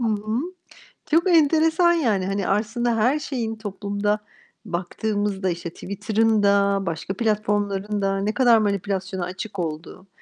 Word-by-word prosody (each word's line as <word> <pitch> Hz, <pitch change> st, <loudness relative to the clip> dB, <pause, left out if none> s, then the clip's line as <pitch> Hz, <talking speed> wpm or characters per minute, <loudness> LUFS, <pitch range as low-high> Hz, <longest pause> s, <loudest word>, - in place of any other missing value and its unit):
hı 235 Hz, -, -1 dB
hı. 215 Hz, +1 st, -1 dB, 0.7 s
Çok 340 Hz, +4 st, +4 dB
enteresan 325 Hz, +2 st, +4 dB
yani. 220 Hz, -, +1 dB
Hani, 195 Hz, 0 st, -2 dB
aslında 225 Hz, +4 st, 0 dB
her 250 Hz, +7 st, +2 dB
şeyin 240 Hz, -7 st, -3 dB
toplumda 205 Hz, 0 st, -2 dB, 0.5 s
baktığımızda, 195 Hz, +2 st, -2 dB
işte, 175 Hz, 0 st, -4 dB
Twitter'ın 215 Hz, +4 st, 0 dB
da, 200 Hz, 0 st, +3 dB
başka 170 Hz, +3 st, -3 dB
platformların 205 Hz, -2 st, 0 dB
da 195 Hz, 0 st, 0 dB
ne 205 Hz, +2 st, -1 dB
kadar 240 Hz, -2 st, +5 dB
manipülasyona 195 Hz, -3 st, -1 dB
açık 185 Hz, +2 st, -7 dB
olduğu, 165 Hz, +3 st, -5 dB
205 Hz, 130 wpm, -23 LUFS, 195-225 Hz, 0.7 s, kadar